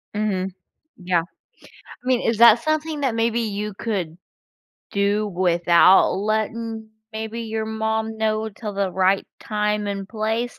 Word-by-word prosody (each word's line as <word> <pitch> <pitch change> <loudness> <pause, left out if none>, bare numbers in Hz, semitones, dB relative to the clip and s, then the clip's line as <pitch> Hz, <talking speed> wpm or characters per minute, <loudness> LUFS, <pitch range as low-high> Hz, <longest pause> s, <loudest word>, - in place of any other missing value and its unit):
Mhm. 190 -3 -1 0.4
Yeah. 180 -2 +1 0.6
I - - -16
mean, 255 -2 +2
is 230 -1 0
that 235 0 +7
something 310 -1 -1
that 260 -5 0
maybe 230 +1 +1
you 210 -1 -3
could 185 -6 -3 0.7
do 205 +1 +1
without 175 0 +4
letting, 220 +2 -2 0.2
maybe, 220 +1 -5
your 220 -1 -3
mom 220 0 -2
know 220 0 0
till 210 0 -7
the 195 -1 0
right 190 +2 +2
time 210 -1 -1
and 195 -1 -4
place? 225 +2 -2
215 Hz, 135 wpm, -22 LUFS, 195-225 Hz, 0.7 s, that